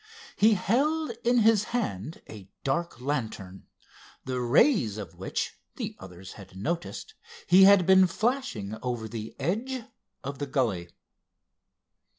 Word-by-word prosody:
He 215 +1 +5
held 285 - +1
in 240 0 +3
his 215 -1 +4
hand 160 - -3
a 100 -3 -11
dark 140 0 -1
lantern, 110 -9 -4 0.6
the 130 -1 -2
rays 120 - +3
of 100 -6 -7
which, - - -4 0.2
the - - -5
others 95 0 -11
had 95 -2 -13
noticed, 100 - -4 0.3
he 190 +2 +7
had 200 -2 +7
been 190 0 +6
flashing 210 - -2
over 120 -3 -3
the 110 0 -7
edge 230 - -2 0.4
of 140 0 -6
the 145 - -3
gully. 115 -11 -1
140 Hz, 130 wpm, -27 LUFS, -, 0.6 s, he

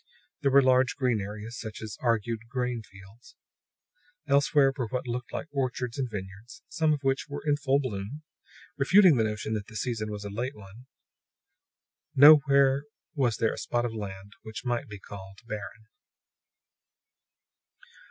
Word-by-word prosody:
There 140 - +3
were 140 +1 +6
large 130 +2 +3
green 125 -7 +1
areas, 105 +3 -7
such 110 -2 -7
as 110 -1 -7
argued 115 -1 -1
grain 125 -2 -2
fields; 95 +3 -17 0.9
elsewhere 140 -1 +3
were 125 -5 -2
what 125 +3 -3
looked 120 0 -4
like - - -4
orchards 130 -2 -2
and 130 -2 -1
vineyards, 100 +3 -9
some 160 -1 +1
of 145 -2 -1
which 135 0 0
were 145 - -6
in 145 -1 +3
full 140 -2 +1
bloom 125 +3 -5 0.6
refuting 180 +1 +6
the 115 - +3
notion 110 0 -2
that 105 -2 -3
the 110 - -13
season 110 -1 -2
was 105 -1 -6
a 100 - -5
late 125 +7 -3
one. 105 +5 -14 1.3
Nowhere 140 -1 +6 0.3
was 125 -6 +1
there 115 -1 +1
a - - -7
spot 120 0 -1
of 115 - -3
land 100 -2 -7
which 110 +3 -8
might 120 -1 -1
be 105 -2 -8
called 95 0 -11
barren. 105 0 -7
120 Hz, 155 wpm, -28 LUFS, 105-135 Hz, 1.3 s, were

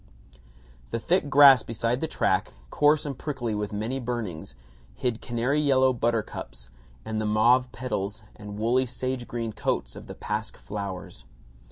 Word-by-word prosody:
The 115 - -2
thick 170 +3 +1
grass 135 -3 +8
beside 115 +3 -2
the 160 - 0
track, - - 0 0.2
coarse 150 +1 +3
and 140 -2 -3
prickly 120 -5 -3
with 105 0 -3
many 110 +6 -2
burnings, 110 - -4 0.4
hid 115 - -1
canary 120 +5 0
yellow 130 -3 +4
buttercups 115 - -3 0.4
and 110 -1 -2
the 110 - -1
mauve 120 +4 +4
petals 110 -4 -4
and 105 -1 -9
woolly 125 +4 +2
sage 125 0 -3
green 115 -2 -4
coats - - -2
of - - -10
the - - -8
pasque 105 0 -4
flowers. 100 -3 -6
120 Hz, 150 wpm, -26 LUFS, 105-130 Hz, 0.4 s, grass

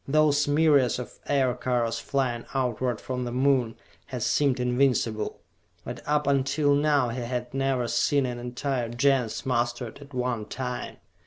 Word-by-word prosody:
Those 150 0 +3
myriads 145 -4 +4
of 125 - -8
Aircars 125 -4 +1
flying 125 -2 -1
outward 125 -2 0
from 125 -1 -4
the 120 - -4
Moon, 130 -2 +2 0.3
had - - -4
seemed 140 -4 +2
invincible; 125 -3 0 0.4
but - - -6
up 150 0 +2
until 140 +1 +2
now 145 -3 +3
he 120 +2 -4
had 125 +1 -4
never 135 -2 0
seen 140 +3 +2
an 120 -1 -4
entire 125 0 -2
Gens 125 0 +1
mustered 120 -1 -1
at 140 0 -13
one 125 -4 -2
time. 125 +1 -5
125 Hz, 145 wpm, -26 LUFS, 120-140 Hz, 0.4 s, myriads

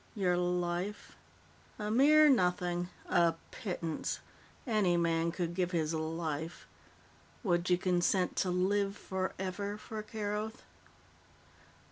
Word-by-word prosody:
"Your 185 -4 +2
life? 180 +3 -2 0.6
A 210 0 -3
mere 300 +6 +7
nothing. 180 -7 +2 0.2
A 170 -1 +3 0.2
pittance. 170 -6 -3 0.5
Any 210 -8 +2
man 165 0 +1
could 170 -1 -2
give 180 0 -1
his 160 -1 0
life. 160 0 -3 0.8
Would 175 -3 +1
you 180 - +5
consent 180 0 +1
to 185 - +1
live 195 +2 +1
forever 190 +2 -3
for 215 0 -6
Keroth?" 215 +1 -4
180 Hz, 105 wpm, -32 LUFS, 175-205 Hz, 0.8 s, mere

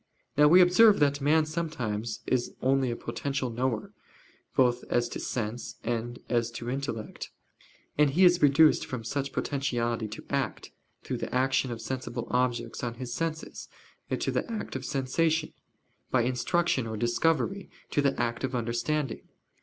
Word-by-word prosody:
Now 150 +1 +6
we 180 +4 +8
observe 200 +4 +6
that 145 -1 +2
man 155 +2 +4
sometimes 125 -10 -3
is 125 -2 -1
only 135 0 +2
a 120 - -2
potential 135 0 -3
knower, 120 -2 -2 0.6
both 125 -1 +3
as 120 0 +1
to - - -5
sense 120 0 -4
and 120 +1 -2
as 120 -1 +1
to 120 +1 -4
intellect. 130 -5 -4 0.7
And 150 -1 +6
he 175 +7 +4
is 175 0 +5
reduced 150 +2 +5
from 125 -3 -5
such 140 +4 -2
potentiality 120 -5 -1
to 105 - -9
act - - -2 0.3
through - - -3
the - - -5
action 130 0 +2
of 115 -1 -5
sensible 120 -2 -4
objects 125 -1 -1
on 120 -1 -2
his 125 -1 -6
senses, 160 +2 -4 0.4
to - - -1
the - - -2
act 220 -10 -4
of 130 0 -4
sensation 155 +4 0 0.6
by 125 -2 +2
instruction 130 +1 +1
or 110 -1 -4
discovery, 165 - 0 0.2
to 145 - +2
the 140 -1 +1
act 115 0 -1
of 130 -1 -1
understanding. 120 +4 -1
130 Hz, 155 wpm, -28 LUFS, 120-150 Hz, 0.7 s, we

